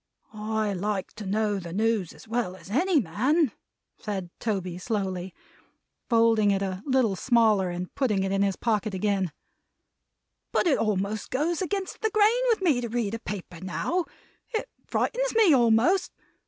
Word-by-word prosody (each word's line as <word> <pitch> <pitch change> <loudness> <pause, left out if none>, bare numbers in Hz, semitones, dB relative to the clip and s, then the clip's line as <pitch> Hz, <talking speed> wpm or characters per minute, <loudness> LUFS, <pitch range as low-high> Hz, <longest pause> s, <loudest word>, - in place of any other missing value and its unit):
I 215 -1 -1
like 195 +1 -2
to 210 -2 -6
know 205 0 0
the 170 -2 -8
news 215 -2 0
as - - -15
well 225 -5 -1
as 190 - -13
any 345 - +3
man," 260 - +1 0.5
said 190 -5 -4
Toby, 185 -5 -2
slowly; 190 -3 -2 0.8
folding 225 -3 +4
it 195 0 +1
a 190 -1 -3
little 255 -7 +2
smaller, 220 -4 +3
and 175 +1 -5
putting 210 -8 +1
it 195 - -1
in 195 0 +1
his 200 -1 +2
pocket 215 -3 -1
again: 190 -2 0 1.2
"but - - +2
it 315 -6 +3
almost 210 0 -1
goes 315 +6 0
against 385 +1 -3
the 440 - +2
grain 435 +3 +3
with 440 -4 +2
me 290 -9 +3
to 235 - -4
read 225 -3 -1
a 230 - -3
paper 185 -6 -7
now. 335 - -1 0.5
It 435 - -1 0.2
frightens - - 0
me 430 -8 +6
almost. 255 - +3
215 Hz, 160 wpm, -27 LUFS, 195-265 Hz, 1.2 s, me